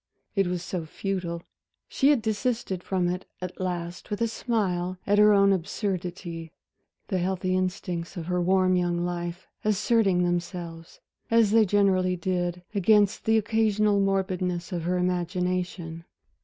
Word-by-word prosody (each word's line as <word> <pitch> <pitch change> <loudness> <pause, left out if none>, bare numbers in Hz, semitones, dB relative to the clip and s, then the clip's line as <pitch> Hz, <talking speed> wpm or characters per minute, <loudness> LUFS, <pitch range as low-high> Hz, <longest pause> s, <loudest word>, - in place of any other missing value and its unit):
It 195 -2 +2
was 180 -1 -2
so 175 -3 -4
futile, 175 -1 -3 0.4
she 270 - +1
had 280 -7 +3
desisted 220 -4 -1
from 180 -1 0
it 180 +1 -3
at 180 0 -6
last 175 -2 -4
with 205 - -3
a 230 - +3
smile 185 -6 -1
at 205 +1 +3
her 210 0 +7
own 200 -1 +5
absurdity, 175 -3 -3 0.6
the 190 -4 0
healthy 185 0 0
instincts 180 -2 -2
of 165 - -4
her 180 +1 0
warm 185 +1 +3
young 175 -1 0
life 175 0 -4 0.2
asserting 210 -3 +2
themselves, 175 -1 -4 0.3
as 230 -2 +4
they 225 0 +5
generally 185 -2 +3
did, 175 0 -2
against 205 +1 +3
the 220 0 +4
occasional 215 -1 +2
morbidness 185 -3 0
of 170 -2 -3
her 180 +1 +1
imagination. 180 -1 -2
185 Hz, 140 wpm, -26 LUFS, 175-200 Hz, 0.6 s, her